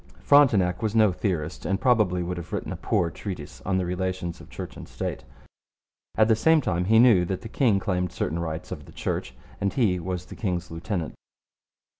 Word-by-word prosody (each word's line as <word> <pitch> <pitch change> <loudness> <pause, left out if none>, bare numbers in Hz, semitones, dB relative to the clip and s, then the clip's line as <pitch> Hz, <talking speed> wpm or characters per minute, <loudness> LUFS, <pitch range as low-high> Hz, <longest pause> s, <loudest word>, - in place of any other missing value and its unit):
Frontenac 105 -11 +4
was 110 -1 -1
no 110 -3 +5
theorist, 85 -4 -3
and 95 0 0
probably 105 -9 +2
would 90 +1 -4
have 85 - -8
written - - -3
a - - -3
poor 85 -2 0
treatise 90 -8 -7
on 95 -1 +2
the 95 - 0
relations 90 -1 -3
of - - -14
Church - - -7
and - - -9
State. 70 - -5 0.9
At 110 - +4
the 110 - +4
same 160 +7 +4
time, 90 - -1
he 110 +4 +4
knew 115 -6 +6
that 95 +1 -3
the 110 - -7
king 115 -3 +2
claimed 90 -3 -1
certain 85 -1 -2
rights 80 -1 -4
over - - -5
the - - -14
Church, 65 - -3 0.2
and 100 -1 0
he 100 -9 +1
was 90 0 -4
the - - -10
king's 90 -6 -3
lieutenant. 85 0 -3
95 Hz, 200 wpm, -26 LUFS, 85-110 Hz, 0.9 s, knew